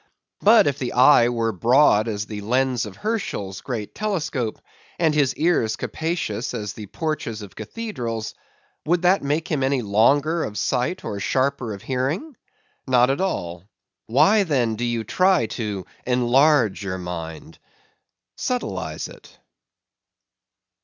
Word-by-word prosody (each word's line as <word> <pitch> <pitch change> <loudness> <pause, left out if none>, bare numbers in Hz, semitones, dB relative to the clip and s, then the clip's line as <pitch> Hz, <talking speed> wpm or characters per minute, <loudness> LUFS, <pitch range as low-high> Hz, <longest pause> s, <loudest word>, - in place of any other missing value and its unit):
But 220 +2 +6
if 140 -1 0
his 125 - -2
eyes 125 -1 +6
were 115 -2 0
broad 115 - +4
as 105 -1 -3
the 105 -2 -6
lens 125 +1 0
of 100 - -10
Herschel's 105 - -3
great 115 -6 -5
telescope; 160 - -2 0.4
and 160 -3 +2
his 140 -3 +2
ears 150 -9 +1
capacious 155 -8 -3
as 105 -1 -4
the 105 -2 -9
porches 115 - -4
of 100 - -11
cathedrals; 115 - -5 0.5
would 170 +3 +1
that 185 +2 +4
make 150 +5 -1
him 155 -7 -1
any 130 -1 +1
longer 140 +11 +3
of 105 - -5
sight, 125 +10 -1
or 100 - -4
sharper 130 +2 0
of 100 - -13
hearing? 140 - -2 0.5
Not 125 0 +4
at 140 - -1
all.—Why 110 - 0
then 130 - +1
do 120 +3 -2
you 120 -1 -1
try 185 - +3
to 105 -4 -4 0.2
"enlarge" 125 -2 +3
your 95 -2 -3
mind? 85 -3 -7 0.8
Subtilize 250 -1 -3
it. - - -16
125 Hz, 135 wpm, -23 LUFS, 110-155 Hz, 0.8 s, But